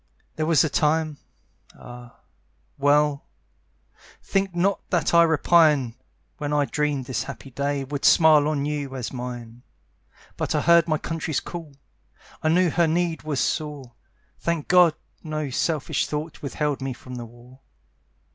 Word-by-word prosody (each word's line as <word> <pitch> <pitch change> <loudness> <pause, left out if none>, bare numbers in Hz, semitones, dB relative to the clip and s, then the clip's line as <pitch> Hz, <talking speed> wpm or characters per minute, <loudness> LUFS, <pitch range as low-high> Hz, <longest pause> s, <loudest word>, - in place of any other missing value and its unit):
There 155 0 -2
was 165 -2 +4
a - - +1
time 155 0 0 0.6
ah, 120 0 -12 0.6
well! 145 0 +2 1.0
Think 195 -2 -1
not 195 +3 +1
that 175 -2 0
I 170 - +7
repine 155 -5 +4 0.5
When 145 -1 -3
I 145 -1 +2
dreamed 145 -3 -1
this 130 - -2
happy 135 0 -9
day 140 +2 -2
Would 140 +1 -5
smile 155 -3 +6
on 145 -2 -1
you 145 -2 -3
as 125 -1 -5
mine; 120 -2 -7 0.8
But - - -2
I - - +2
heard 170 -1 +5
my 155 -1 +1
country's 160 -1 -3
call; 165 -5 -9 0.7
I 155 - +1
knew 175 +1 +3
her 170 +1 +2
need 165 -1 0
was 150 -4 -3
sore. 145 -6 -3 0.5
Thank 170 -3 -2
God, 175 -3 +5 0.3
no 155 -3 -4
selfish 150 +2 -1
thought 150 +1 -5
Withheld 145 0 -2
me 135 -1 -3
from 125 +1 -12
the 120 -1 -6
war. 120 +3 -17
150 Hz, 145 wpm, -24 LUFS, 135-160 Hz, 1.0 s, I